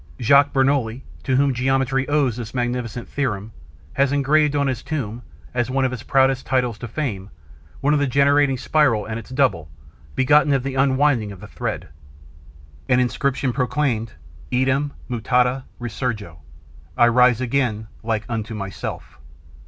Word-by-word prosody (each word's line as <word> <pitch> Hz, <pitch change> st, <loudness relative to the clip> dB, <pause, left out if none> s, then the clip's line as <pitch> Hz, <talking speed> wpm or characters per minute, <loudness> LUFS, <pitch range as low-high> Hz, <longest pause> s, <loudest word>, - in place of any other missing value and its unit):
Jacques 140 Hz, +4 st, +5 dB
Bernouilli, 135 Hz, -3 st, +1 dB, 0.2 s
to 130 Hz, -, 0 dB
whom 140 Hz, 0 st, +3 dB
geometry 135 Hz, +1 st, 0 dB
owes 145 Hz, -6 st, +2 dB
this 120 Hz, 0 st, -7 dB
magnificent 120 Hz, -1 st, -3 dB
theorem, 110 Hz, -7 st, -3 dB, 0.4 s
had 140 Hz, -1 st, +2 dB
engraved 145 Hz, +1 st, +2 dB
on 140 Hz, -1 st, +2 dB
his 130 Hz, -3 st, -2 dB
tomb, 120 Hz, -7 st, -4 dB, 0.3 s
as 120 Hz, 0 st, 0 dB
one 135 Hz, +1 st, +1 dB
of 130 Hz, -, 0 dB
his 125 Hz, -3 st, -5 dB
proudest 135 Hz, 0 st, +2 dB
titles 125 Hz, -4 st, 0 dB
to 120 Hz, -, -6 dB
fame, 105 Hz, -7 st, -4 dB, 0.5 s
the 145 Hz, 0 st, +2 dB
generating 140 Hz, +1 st, +3 dB
spiral 125 Hz, -7 st, +2 dB
and 110 Hz, +1 st, -4 dB
its 110 Hz, -, -12 dB
double, 125 Hz, -, +1 dB, 0.5 s
begotten 145 Hz, +2 st, +4 dB
of 135 Hz, -2 st, +1 dB
the 135 Hz, 0 st, -3 dB
unwinding 135 Hz, -4 st, +2 dB
of 100 Hz, -, -10 dB
the -, -, -10 dB
thread. -, -, -5 dB, 1.0 s
An 125 Hz, -1 st, +4 dB
inscription 130 Hz, +1 st, 0 dB
proclaimed, 125 Hz, -3 st, -1 dB, 0.4 s
'Eadem 130 Hz, +3 st, +1 dB, 0.2 s
mutata 125 Hz, +2 st, +1 dB
resurgo: 110 Hz, -7 st, -4 dB, 0.6 s
I 120 Hz, -, +6 dB
rise 125 Hz, 0 st, +4 dB
again 120 Hz, -4 st, -1 dB, 0.2 s
like 110 Hz, -1 st, -2 dB
unto 110 Hz, -1 st, -4 dB
myself.' 100 Hz, -2 st, -6 dB
130 Hz, 145 wpm, -22 LUFS, 115-140 Hz, 1.0 s, I